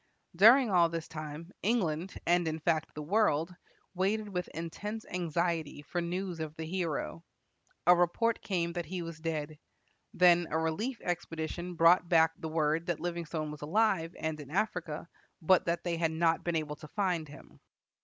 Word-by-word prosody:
During 230 +6 +7
all 170 -2 +5
this 165 -1 -4
time 155 +2 -7
England 185 -6 0
and, 175 -1 +3
in 160 0 -1
fact, 160 0 0
the 150 - -5
world 175 -2 +2 0.4
waited 205 +3 0
with 180 -2 -3
intense 205 +7 -6
anxiety 170 -3 -2
for 175 +3 -3
news 180 0 -3
of 155 -1 -5
the 160 - -5
hero. 165 -1 -3 0.6
A 180 +1 +8
report 175 +7 +1
came 170 -3 -1
that 175 -1 -4
he 180 -1 -4
was 165 -1 -7
dead. 155 -2 -4 0.6
Then 175 -1 +5
a 160 - 0
relief 195 +11 -1
expedition 175 0 -4
brought 170 +1 +5
back 160 -1 +5
the 160 -3 -6
word 155 +1 0
that 175 -3 -1
Livingstone 165 -3 -3
was 150 - -9
alive, 175 0 +1
and 160 -1 -2
in 145 -2 -9
Africa, 170 -4 -2 0.3
but 180 +2 +4
that 170 0 -1
they 170 -2 -1
had 165 -1 +1
not 165 0 +1
been 170 -1 -1
able 150 -2 -2
to 150 - -11
find 180 -3 -1
him. 145 - -14
170 Hz, 170 wpm, -31 LUFS, 160-180 Hz, 0.6 s, A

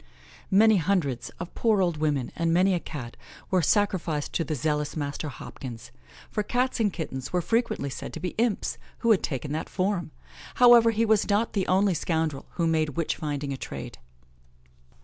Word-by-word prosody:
Many 215 +2 +6
hundreds 160 -8 0
of 175 0 -6
poor 220 -3 +2
old 175 -4 +1
women, 150 -5 0
and 165 -1 0
many 185 +3 +4
a 175 - +1
Cat, 130 -8 -7 0.4
were 185 -1 +3
sacrificed 170 -5 0
to 165 - +1
the 155 0 -3
zealous 150 +2 -1
Master 145 +1 -3
Hopkins, 125 -3 -9 0.4
for 210 - 0
Cats 245 +5 0
and 210 -3 +2
Kittens 135 -7 -5
were 180 - +1
frequently 225 - 0
said - - -6
to - - -5
be 180 +2 -2
imps, 230 -3 0 0.3
who 230 - +6
had 205 - +4
taken 140 0 -3
that 155 +2 -3
form. 185 -2 -1 0.5
However, 240 -2 +7
he 225 0 +1
was 215 -2 +2
not 210 +3 +1
the 195 -3 0
only 190 +1 +3
scoundrel 160 -3 -1
who 170 - 0
made 155 -3 0
witch 165 - 0
finding 145 -2 -3
a - - -5
trade. - - -7
170 Hz, 180 wpm, -26 LUFS, 150-205 Hz, 0.5 s, However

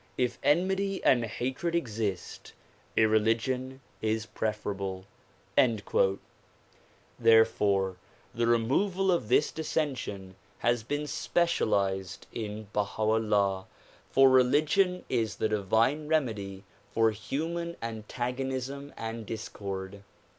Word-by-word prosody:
If 125 -1 0
enmity 190 +5 +1
and 120 -3 +4
hatred 130 +9 -2
exist, 110 - -3 0.4
irreligion 115 +4 +2 0.2
is 110 0 0
preferable." 100 -3 -3 2.1
Therefore 105 -4 +4 0.4
the 115 0 0
removal 180 - +2
of 170 -12 0
this 150 - +3
dissension 130 -12 -3 0.2
has 120 -1 +1
been 145 +6 -3
specialized 100 - 0
in 110 -1 -5
Baha 105 +1 -1
'Ullah, 105 -3 +1 0.4
for 135 0 +6
religion 155 +9 +3
is 115 -4 0
the 110 - 0
divine 110 +9 +1
remedy 105 -11 -1 0.3
for 115 -1 +3
human 165 +10 -3
antagonism 130 +5 -4
and 115 0 -5
discord. 100 -3 -6
115 Hz, 90 wpm, -29 LUFS, 105-140 Hz, 2.1 s, for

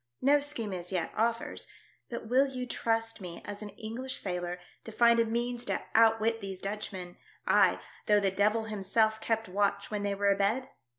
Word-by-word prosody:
No 285 +2 +6
scheme 260 -8 -3
as 180 0 -5
yet 180 -3 -1
offers, 230 +1 -1 0.4
but 235 -2 -5
will 260 +4 +4
you 255 -2 -4
trust 225 -2 -1
me 175 -2 -7
as 205 0 -7
an 210 - -6
English 230 +6 -5
sailor 180 -1 -3 0.2
to 225 - -8
find 235 +1 +5
a 230 - +4
means 240 +2 -2
to - - -2
outwit 225 0 +4
these 195 -2 -6
Dutchmen, 195 -3 -5 0.3
ay, - - +4 0.3
though 210 -1 +5
the 195 -1 +1
Devil 210 +3 +2
himself 220 +1 +1
kept 225 -1 0
watch 200 +2 0
when 210 -1 -1
they 200 -1 -1
were 200 0 +2
abed? 205 +7 +1
220 Hz, 180 wpm, -30 LUFS, 200-230 Hz, 0.4 s, No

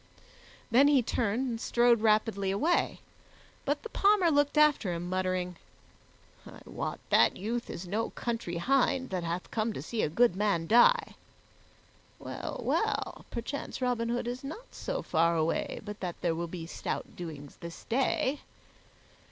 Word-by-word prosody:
Then 265 +5 +6
he 280 -4 +4
turned 235 +3 0
and 230 -2 -3
strode 235 -1 +3
rapidly 215 -2 +2
away; 305 - +1 0.6
but 290 +1 -1
the 460 - -6
Palmer 395 -5 +4
looked 290 0 +2
after 300 -10 +4
him, 170 +1 -4
muttering, 185 -1 -1 0.9
"I - - -12
wot - - -4
that - - +5
youth 230 +5 -3
is 180 - -6
no 215 +5 -1
country 230 -8 -3
hind 260 +5 +1
that 185 -2 -2
hath 170 +2 -4
come 220 0 -1
to - - -5
see 230 -2 -2
a - - +1
good 230 +4 +3
man 195 -5 +1
die. 460 - +5 1.0
Well, - - -6
well, - - -1
perchance 240 +4 -5
Robin 245 -2 0
Hood 240 0 -1
is 245 +2 -4
not 320 - -8
so - - -4
far 165 0 +2
away 160 +1 -1
but 210 0 -7
that 180 -2 -5
there 170 -2 +1
will 170 +1 -3
be 165 -1 -6
stout 165 - -5
doings 150 -5 -8
this 170 0 -9
day." 265 +3 0
225 Hz, 155 wpm, -30 LUFS, 180-260 Hz, 1.0 s, Then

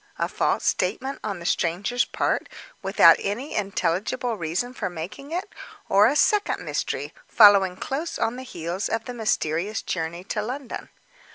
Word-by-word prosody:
A - - 0
false - - 0
statement, 270 +1 -1
on 205 -3 -3
the 170 - -10
stranger's 200 +10 0
part, - - -1 0.3
without - - +6
any 230 +9 -3
intelligible 200 +4 -1
reason 180 +7 -2
for 255 - -3
making 180 - -7
it? 350 +3 -4 0.4
Or 200 +2 +6
a 270 - +1
second 415 +6 +2
mystery, - - -3
following 200 -4 +6
close 300 - -3
on 230 - 0
the 255 - -7
heels 175 -5 -4
of 225 0 -2
the 250 - -6
mysterious 205 -3 -1
journey 170 0 -3
to 210 - -2
London? 250 +4 -6
210 Hz, 155 wpm, -24 LUFS, 180-250 Hz, 0.4 s, without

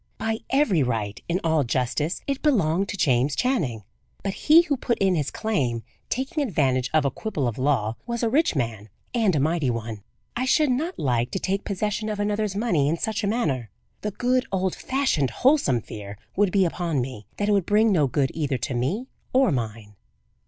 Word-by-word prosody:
By 220 0 -1
every 260 - +3
right, 110 -5 -2
in 175 +2 +1
all 160 -3 +2
justice, 130 +6 -1
it 275 -1 -2
belonged 195 - +2
to 205 - -4
James 135 -3 +2
Channing; 155 - 0 0.4
but 195 - -1
he 320 - +6
who 300 -4 0
put 245 -2 -1
in 195 -1 +2
his 150 -5 0
claim, 130 - -1 0.3
taking 270 +5 -1
advantage 135 - +1
of 155 -2 +3
a 140 - +2
quibble 185 - -2
of 120 +1 -3
law, 125 -5 +1
was 235 0 -2
a - - +3
rich 280 - +2
man 115 -5 -2 0.2
and 220 -8 +2
a - - +2
mighty 155 -1 +1
one. 115 -3 -4 0.3
I 255 - 0
should 295 +1 +3
not 320 +9 -1
like 120 -3 0
to 190 - -3
take 195 +2 -2
possession 210 +2 -2
of 210 -1 -3
another's 205 -1 -1
money 175 -10 +2
in 165 - 0
such 220 +4 -2
a - - +1
manner. 145 - -1 0.3
The 210 - -1
good, 250 +4 0
old 190 -1 0
fashioned, 260 - 0
wholesome 245 - +3
fear 105 -2 -8 0.2
would 200 -1 +3
be 195 -1 +3
upon 170 -3 -1
me, 120 -5 -5
that 205 - 0
it - - +3
would 200 -4 +2
bring 215 +1 +4
no 155 -7 +3
good 135 +1 0
either 145 -4 -1
to 125 +3 -3
me 155 - -1 0.3
or 260 -4 +4
mine. 110 -5 -4
175 Hz, 200 wpm, -25 LUFS, -, 0.4 s, he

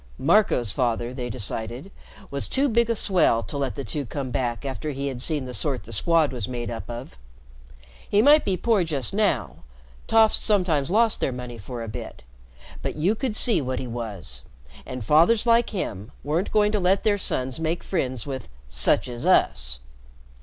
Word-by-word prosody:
Marco's 145 - +3
father, 120 0 -1
they 125 -2 -4
decided, 115 - -5 0.4
was 140 -1 -1
too 275 +2 +2
big 235 -1 +2
a 230 - +2
swell 175 - +3
to - - -7
let 140 -2 -2
the 140 - -4
two 145 +2 -3
come 135 +1 -5
back 120 +1 -2
after 135 +3 -4
he 140 0 -3
had 125 -2 -5
seen 150 -1 +1
the 125 - -7
sort 135 -1 -1
the 115 - -10
Squad 160 +6 +2
was 120 -5 -3
made 120 -2 -4
up 115 0 -6
of. 120 - -8 0.9
He 205 - +3
might 290 +7 +6
be 190 -2 0
poor 220 -4 +2
just 145 -8 -2
now, 145 - 0 0.5
toffs 225 -1 +5
sometimes 180 -10 +1
lost 225 +3 +3
their - - 0
money 125 -2 -7
for 115 +3 -6
a - - -6
bit, 105 - -8 0.6
but - - -3
you 170 +7 +2
could 225 -1 -3
see 225 -5 +3
what 130 -1 -3
he 130 - -3
was, 105 - -6 0.5
and 125 -4 -6
fathers 170 - +4
like 235 0 +4
him 110 - -4
weren't 160 +6 -1
going 210 -1 +3
to 210 - +1
let 190 +1 +2
their 205 -2 +2
sons 130 -6 -2
make 165 +1 -2
friends 130 - -2
with 135 -2 -6 0.2
"such 100 - +2
as 120 -1 -5
us." - - +2
140 Hz, 190 wpm, -24 LUFS, 120-195 Hz, 0.9 s, might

